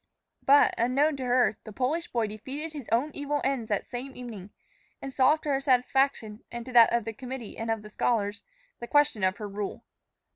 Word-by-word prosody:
But, 285 +1 +5
unknown 275 +6 +2
to 260 - -4
her, 245 -3 +3
the 215 - -9
Polish 290 - -1
boy 235 -2 0
defeated 265 +9 -6
his 285 -6 -8
own 250 +7 +2
evil 290 0 -2
ends 260 -4 -1
that 205 -2 0
same 255 +2 -7
evening, 220 -6 -8 0.5
and 270 - -7
solved 280 +4 +3
to 300 - -3
her 275 -1 +1
satisfaction, 255 -4 +1
and 235 -1 -6
to 255 - -8
that 235 -2 +7
of 235 -2 +1
the 225 - -4
committee 250 -1 -7
and 225 0 -5
the - - -9
scholars, 210 -2 0 0.4
the 235 - -6
question 290 -8 +3
of 185 +1 +2
her 210 -2 -5
rule. 200 0 -5
245 Hz, 195 wpm, -28 LUFS, 220-275 Hz, 0.5 s, that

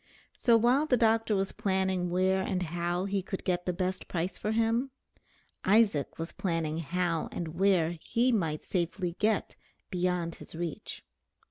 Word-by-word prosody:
So 235 -2 +4
while 250 +7 +3
the 250 - +3
doctor 225 -1 +3
was 195 0 0
planning 190 -2 0
where 185 +2 +2
and 190 -1 -1
how 175 +2 -1
he 200 0 0
could 190 +1 -5
get 180 -1 -1
the - - +3
best 185 +1 -2
price 175 +1 -2
for 215 - -2
him, 230 +4 +1 0.7
Isaac 200 -8 +3
was 165 +1 -4
planning 165 -3 -2
how 170 0 -1
and 170 -2 -4
where 170 -1 +2
he 245 +2 +2
might 165 -9 -1
safely 175 0 -2
get 215 0 +1 0.4
beyond 180 -2 0
his - - -10
reach. 170 -2 -5
185 Hz, 155 wpm, -30 LUFS, 170-210 Hz, 0.7 s, So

